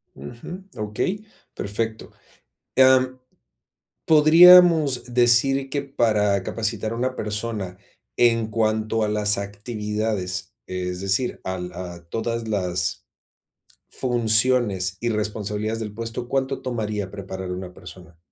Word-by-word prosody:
Ujú, 120 - -9
okey. 110 - -3 0.3
Perfecto. 110 +2 -4 0.7
Am, 130 -1 +4 0.9
podríamos 160 -4 +6
decir 125 +3 +4
que 140 +1 -1
para 110 -7 +1
capacitar 110 -1 -2
a - - -3
una 130 +2 -2
persona 105 -3 -4 0.4
en 115 -2 +3
cuanto 110 0 0
a - - +1
las 105 -1 +2
actividades, 105 -2 -4
es 90 0 -4
decir, 100 +6 0
al 90 -1 -4
a 85 -1 -8
todas 115 0 -3
las 90 -5 -2 0.8
funciones 110 -5 +1
y 120 - 0
responsabilidades 105 0 -3
del 105 -2 -5
puesto, 115 +2 -5
¿cuánto 135 0 -1
tomaría 105 -5 -3
preparar 95 -2 -7
una 90 0 -6
persona? 90 -2 -13
110 Hz, 110 wpm, -23 LUFS, 100-120 Hz, 0.9 s, podríamos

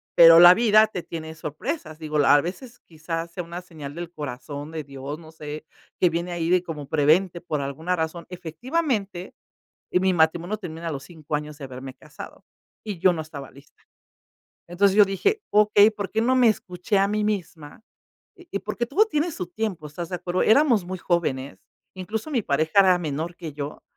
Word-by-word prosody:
Pero, 165 0 +9
la 175 +1 +10
vida 215 0 +5
te 180 -5 -6
tiene 160 -1 -7
sorpresas, 160 - -5
digo, 155 -1 -2
la 145 0 +6
a 145 - +5
veces, 235 - -7
quizás 165 +1 -5
sea 180 -1 -5
una 170 +2 -7
señal 155 -5 -10
del 170 0 -6
corazón 145 +1 -7
de 160 -1 -5
Dios, 140 +2 -7
no 160 -1 -14
sé, 150 -1 -8 0.3
que 180 - +4
viene 170 +2 -3
ahí 170 -1 -2
de 180 0 +3
como 150 -5 -7
prevente 165 +4 +2
por 155 -4 -3
alguna 160 +6 -2
razón. 160 +1 -3
Efectivamente, 195 - -3 0.6
mi 185 +1 +2
matrimonio 170 +4 +1
termina 170 -4 -7
a - - -3
los 135 - -6
5 155 -3 -6
años, 150 0 -5
de 140 - -7
haberme 130 0 -8
casado, 145 +2 -12 0.4
y 205 -6 -6
yo 185 - +5
no 160 - -4
estaba 145 -3 -10
lista. 140 +2 -20 0.9
Entonces, 190 +2 +2
yo 210 - +8
dije: 405 - 0
"Okey, 210 0 +6
¿por 205 -3 -6
qué 220 - +1
no 255 +3 +2
me 245 -3 +5
escuché 185 0 -2
a 195 - +3
mí 210 +1 -1
misma?", 175 -5 -4 0.6
y 350 - -6
porque 230 +3 -3
todo 375 - +3
tiene 320 -3 -1
su 180 -10 -5
tiempo, 185 -6 -4
¿estás 165 +3 -6
de - - -3
acuerdo? 175 +1 -1
Éramos 235 -4 +4
muy 185 +1 -5
jóvenes, 145 -7 -1 0.4
incluso, 215 - -5
mi 245 -6 0
pareja 160 +7 +2
era 185 -2 +5
menor 160 +1 -4
que 165 -3 -7
yo, 145 0 -7
175 Hz, 190 wpm, -24 LUFS, 155-200 Hz, 0.9 s, la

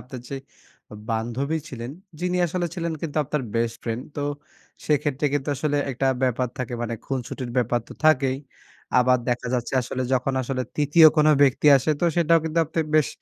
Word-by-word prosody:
আপনার 125 0 -9
যে 140 - -4 0.7
বান্ধবী 120 +7 -1
ছিলেন, 120 -4 -6 0.3
যিনি 180 0 0
আসলে 175 +1 -2
ছিলেন 170 -2 -2
কিন্তু 160 -3 -5
আপনার 150 0 -2
বেস্ট 115 0 0
ফ্রেন্ড। 115 +1 -3
তো 145 - -2 0.6
সেক্ষেত্রে 145 -1 +1
কিন্তু 145 -1 -1
আসলে 145 +1 0
একটা 135 +1 -1 0.2
ব্যাপার 125 0 +1
থাকে 125 -1 -3
মানে, 115 0 -2
খুনসুটির 130 -1 -4
ব্যাপার 120 -1 +1
তো - - -9
থাকেই। 135 -4 +4 0.6
আবার 125 0 +4
দেখা 125 0 -1
যাচ্ছে 120 -2 -2
আসলে 130 +1 -3
যখন 130 +1 +1
আসলে 130 0 -2
৩য় 150 +2 +6
কোন 150 0 +4 0.2
ব্যক্তি 140 +1 +3
আসে, 135 +4 0
তো - - +2
সেটাও 165 -1 +4
কিন্তু 160 +1 -1
আপনি 160 +2 -1
বেশ 155 -2 +4
135 Hz, 175 wpm, -24 LUFS, 125-155 Hz, 0.7 s, ৩য়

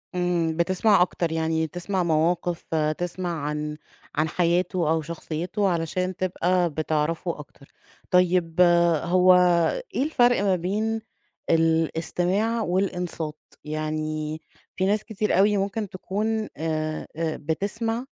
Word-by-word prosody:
إمم، 175 -2 0
بتسمَع 185 +3 +3
أكتر، 170 -2 0
يعني 160 0 0
تسمَع 180 +3 -2
مَواقِف، 170 +1 0 0.3
تسمَع 175 -2 -3
عن 150 0 -3 0.4
عن 155 +1 +1
حياته 175 -1 +1
أو 160 0 +2
شخصيته، 170 +5 -3
علشان 180 +2 -1
تبقى 180 -1 +1
بتعرفه 155 +2 -1
أكتر. 145 -1 -13 0.4
طيب 180 -1 +3 0.4
هو 180 +1 +5 0.6
إيه 265 - +2
الفرق 245 -7 +3
ما 195 -2 +2
بين 215 +5 -1 0.5
الاستماع 170 +7 +1
والإنصات؟ 180 -5 -2 0.2
يعني 155 0 -3 0.3
في 190 - 0
ناس 210 +2 +1
كتير 210 -4 -1
أوي 205 +1 +4
ممكن 200 +1 -2
تكون 215 +4 -2
آآ 155 0 -2
بتسمَع، 200 - -2
175 Hz, 110 wpm, -25 LUFS, 160-190 Hz, 0.6 s, هو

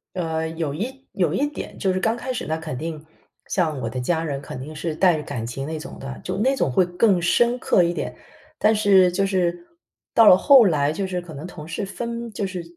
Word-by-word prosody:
呃， 160 -2 -2
有 160 -3 -3
一 260 - -6
有 175 -5 +1
一 285 +9 +1
点。 295 - -8
就 190 - +1
是 185 - -1
刚 220 +4 +1
开 255 +2 -4
始 250 - -4
那 160 +1 -1
肯 160 -5 -6
定 155 +1 -6 0.4
像 160 -6 0
我 115 - -2
的 125 - -4
家 160 +6 0
人， 140 -4 -3
肯 130 - -8
定 150 +4 -8
是 155 0 -3
带 175 -1 +4
着 150 - -5
感 115 -5 -5
情 130 +4 -5
那 160 0 -4
种 155 - -9
的， 135 -1 -7
就 185 +1 -3
那 260 +6 +2
种 140 - 0
会 180 +9 +3
更 180 +1 +2
深 240 +8 +3
刻 185 - +3
一 170 0 0
点。 - - -4 0.4
但 215 - +4
是 195 -4 +5
就 195 +3 +1
是 175 -3 -1 0.5
到 225 -2 +6
了 185 - +9
后 270 +1 +7
来， 150 -5 +2
就 195 +5 -2
是 180 -1 -3
可 175 -2 -11
能 145 +3 -7
同 155 -4 -10
事 165 +5 -3
分 235 +3 -5
就 200 -1 -3
是 185 -2 -5
175 Hz, 260 characters per minute, -23 LUFS, 155-200 Hz, 0.5 s, 了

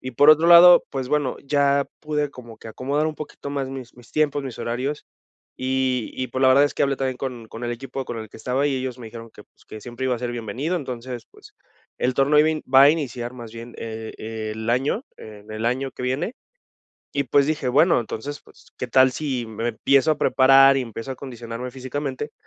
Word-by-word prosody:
Y 130 -1 -6
por 145 +5 +7
otro 160 +2 +5
lado, 175 +1 +9
pues 130 -2 -4
bueno, 145 -4 0
ya 140 0 +2
pude 150 -1 -2
como 120 -4 -12
que 115 - -10
acomodar 140 +7 -1
un 155 - -3
poquito 145 -1 -8
más 140 -2 -3
mis 130 -3 -8
mis 120 -1 -17
tiempos, 145 -2 +1
mis 130 -4 -7
horarios 130 +5 -3 0.5
y 130 -2 -1
y 130 - -3
pues, 130 +2 -3
la 130 - +6
verdad 140 +2 +6
es 145 - -2
que - - 0
hablé 140 -1 +1
también 130 -1 -2
con 125 -4 -6
con 115 +2 -7
el 120 - -2
equipo 135 +2 -6
con 115 - -6
el 110 -1 -7
que - - -14
estaba 130 +5 0
y 140 - 0
ellos 130 -1 -4
me 115 - -9
dijeron 115 0 -10
que - - -14
pues: - - -28
"Que 110 - -9
siempre 120 +3 -6
iba 125 - +1
a - - -5
ser 120 0 -3
bienvenido", 120 - -3
entonces, 125 -5 -6
pues - - -18 0.4
el 125 - +1
torneo 145 +2 +3
iba 155 - +4
a - - 0
in 155 - -5
va 135 - +9
a 140 - +8
iniciar 125 -6 -3
más 120 -3 -10
bien 115 +1 -9
e 110 -1 -6
el 110 +1 -6
año 135 - 0
en 105 0 -12
el 110 +1 -5
año 130 +2 -1
que - - -8
viene, 145 - -2 0.8
y 140 0 0
pues, 140 +3 +3
dije, 150 -5 -1
bueno, 150 +4 +4
entonces, 130 +6 -6
pues - - -21
qué - - -4
tal 130 0 +5
si 130 -6 -3
me 115 +2 -3
empiezo 135 +6 +3
a 150 - -1
preparar 135 0 +6
y - - +1
empiezo 115 +2 -6
a - - -3
acondicionarme 120 -1 -7
físicamente, 135 +2 -5
130 Hz, 230 wpm, -23 LUFS, 120-140 Hz, 0.8 s, lado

